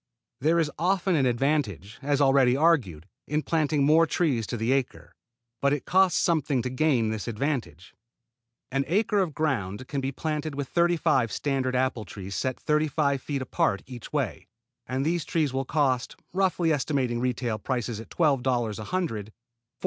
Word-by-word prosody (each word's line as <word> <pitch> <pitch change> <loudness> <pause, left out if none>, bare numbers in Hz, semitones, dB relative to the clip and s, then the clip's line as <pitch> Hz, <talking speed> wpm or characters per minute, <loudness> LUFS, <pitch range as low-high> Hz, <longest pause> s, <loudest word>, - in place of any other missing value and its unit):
There 160 +5 +2
is 160 -3 +1
often 185 +1 +1
an 135 -4 +3
advantage, 120 - -1
as 145 0 +1
already 135 -2 +4
argued, 120 - +2 0.2
in 150 +1 0
planting 155 -3 +1
more 160 +3 +5
trees 135 - 0
to 120 - -3
the 115 +3 0
acre, 135 -2 -2 0.5
but 140 0 +3
it 145 - -3
costs 185 -1 +3
something 150 -7 +1
to 125 - -3
gain 130 -5 +2
this 110 0 -4
advantage. 115 - -3 0.8
An 135 +1 +1
acre 205 +5 +2
of 175 -7 -1
ground 125 -7 -2
can 140 -2 -2
be 135 +1 -2
planted 150 +1 -3
with 140 -1 -3
thirty 175 0 +2
five 125 -7 +2
standard 135 -3 -1
apple 125 -4 0
trees 95 +1 -8
set 130 +3 -2
thirty 150 +1 +1
five 140 -2 0
feet 140 -1 -3
apart 100 -5 0
each 125 -3 -10
way, - - -2 0.4
and 130 +2 -1
these 170 0 0
trees 150 -5 0
will 135 0 -1
cost, 130 -4 0 0.2
roughly 180 -3 +2
estimating 135 -4 0
retail 120 -3 -1
prices 120 -1 -3
at 115 - -10
$12 125 - +1
a - - -5
hundred, 155 - -2
$4.20. - - -16
135 Hz, 170 wpm, -26 LUFS, 120-155 Hz, 0.8 s, more